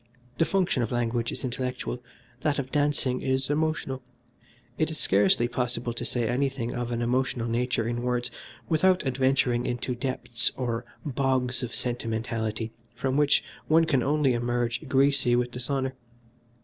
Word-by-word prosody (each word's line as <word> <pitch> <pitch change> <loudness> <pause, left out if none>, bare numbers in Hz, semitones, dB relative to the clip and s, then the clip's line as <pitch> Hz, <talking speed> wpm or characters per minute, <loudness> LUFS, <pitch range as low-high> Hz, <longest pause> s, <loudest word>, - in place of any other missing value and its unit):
The 165 - +5
function 180 -9 +1
of 115 - -1
language 120 -1 0
is - - -6
intellectual, 125 -1 -3 0.4
that 145 +1 +1
of 130 -2 -3
dancing 145 -3 +1
is 130 +1 0
emotional. 150 -3 0 0.8
It - - +2
is - - -4
scarcely 100 +4 +3
possible 120 -1 -2
to 115 - -4
say 120 -2 -1
anything 130 -1 0
of 120 -1 -2
an 120 0 -1
emotional 125 -1 0
nature 120 0 0
in 120 0 -1
words 125 0 0 0.4
without 180 +2 +3
adventuring 130 -2 +2
into 120 +1 -1
depths 125 -1 -2
or 120 -2 -2 0.2
bogs 130 -2 +1
of 120 -2 -4
sentimentality 115 -2 -2 0.2
from 130 +2 -1
which 145 0 +4 0.2
one 165 +1 +5
can 140 -5 +2
only 140 0 +3
emerge 120 +3 -1
greasy 135 -2 +3
with 120 0 +1
dishonour. 130 +2 -2
125 Hz, 150 wpm, -27 LUFS, 120-135 Hz, 0.8 s, The